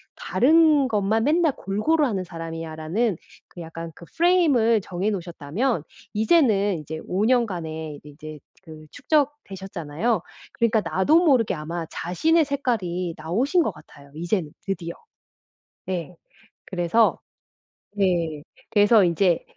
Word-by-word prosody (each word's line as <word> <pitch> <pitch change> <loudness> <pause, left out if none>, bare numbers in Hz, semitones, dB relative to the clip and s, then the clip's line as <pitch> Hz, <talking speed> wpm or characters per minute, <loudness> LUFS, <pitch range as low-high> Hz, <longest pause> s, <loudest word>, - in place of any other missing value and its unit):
다른 305 0 +4
것만 215 0 +1
맨날 315 0 +3
골고루 290 +11 +1
하는 200 -8 -1
사람이야.' 165 -2 -7
라는 175 +6 -1 0.3
그 175 - -10
약간 165 0 -7
그 170 - -13
프레임을 290 - +4
정해 185 +3 -2
놓으셨다면 175 - -2 0.3
이제는 210 - +3
이제 155 +1 -7
5 195 +4 0
년간의 165 - -1
이제 150 +1 -10 0.2
그 155 -3 -12
축적되셨잖아요. 210 - -1 0.3
그러니까 230 -2 +2
나도 190 - +3
모르게 255 - +3
아마 165 +2 -5
자신의 315 - +1
색깔이 185 - -2
나오신 240 - +1
것 - - -1
같아요 140 0 -17
이제는 170 -1 -2
드디어. 180 -4 -4 1.0
예. 180 -2 -4 0.5
그래서 185 +5 +2 0.8
...네 170 -7 0 0.3
그래서 210 0 +5
이제 175 0 +2
195 Hz, 275 characters per minute, -24 LUFS, 165-240 Hz, 1.0 s, 그래서